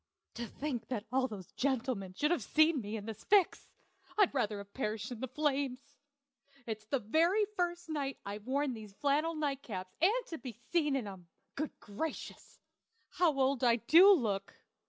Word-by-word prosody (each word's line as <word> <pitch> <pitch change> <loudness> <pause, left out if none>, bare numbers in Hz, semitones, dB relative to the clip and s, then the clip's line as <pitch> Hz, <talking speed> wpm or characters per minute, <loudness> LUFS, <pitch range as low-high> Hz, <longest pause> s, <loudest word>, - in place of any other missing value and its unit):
To 235 0 -5
think 270 -4 -4
that 225 -4 -3
all 260 0 +2
those 195 -7 -9
gentlemen 245 -8 -1
should 300 - +1
have 350 - +2
seen 310 -2 +3
me 210 +1 -4
in 205 - -7
this 220 -2 -7
fix! 400 -4 +3 0.5
I'd 410 -7 +4
rather 215 -6 0
have 200 0 -10
perished 215 -2 -3
in 240 - -6
the 260 - -3
flames. 280 0 -2 0.7
It's 220 -1 -5
the 275 - 0
very 330 - +3
first 350 -1 -1
night 285 -4 -2
I've 205 +2 -6
worn 280 0 +1
these 215 -3 -9
flannel 300 +5 +1
night 285 -3 -1
caps, 185 -7 -6
and 440 +7 +3
to 325 - -5
be 250 -3 -7
seen 290 +5 0
in 260 -5 -1
'em! 190 -4 -9 0.3
Good 305 +1 -4
gracious! 230 +10 -6 0.5
how 325 -6 +2
old 265 -1 +2
I 235 -2 +6
do 330 - +7
look! 210 - +1
265 Hz, 175 wpm, -33 LUFS, 220-310 Hz, 0.7 s, do